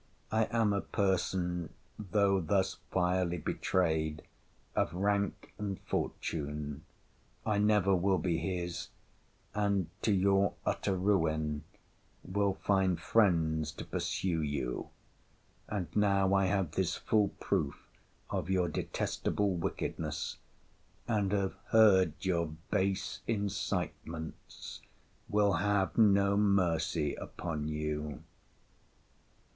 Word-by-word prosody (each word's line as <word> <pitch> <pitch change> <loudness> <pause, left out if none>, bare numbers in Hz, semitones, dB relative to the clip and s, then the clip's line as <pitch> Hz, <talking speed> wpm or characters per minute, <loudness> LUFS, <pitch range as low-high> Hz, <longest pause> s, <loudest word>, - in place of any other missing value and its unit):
I 110 0 +3
am 115 -3 +2
a 100 - 0
person, 90 -3 -1 0.2
though 100 -1 +2
thus 95 +3 +1
vilely 90 -1 +1
betrayed, 80 -2 0 0.5
of - - +1
rank 100 +1 0
and 100 -2 -3
fortune. 75 -1 -3 0.6
I 105 -1 +1
never 105 -2 +4
will 95 +1 +2
be 85 -3 0
his; 85 0 -3 0.7
and, 100 -4 +1
to 110 - +2
your 100 0 +3
utter 100 - 0
ruin, 80 -6 +1 0.6
will 100 +1 0
find 95 -4 +1
friends 80 -7 +2
to - - -7
pursue 85 -4 -1
you: 70 -4 -2 0.8
and 100 -4 -1
now 100 -2 +3
I 95 -1 +4
have 95 -5 0
this 90 +1 0
full 105 -2 +2
proof - - -1 0.5
of - - -2
your 90 -2 +2
detestable 100 -2 -1
wickedness, 85 -2 -3 0.7
and 105 -4 +1
have 100 -2 +1
heard 95 -7 +6
your 85 -3 +1 0.2
base 95 0 0
incitements, 95 -6 -4 0.5
will 105 -1 +3
have 100 +1 +1
no 100 -2 +5
mercy 85 -6 +2
upon 80 -4 -4
you! 75 -1 -3
95 Hz, 105 wpm, -32 LUFS, 80-100 Hz, 0.8 s, heard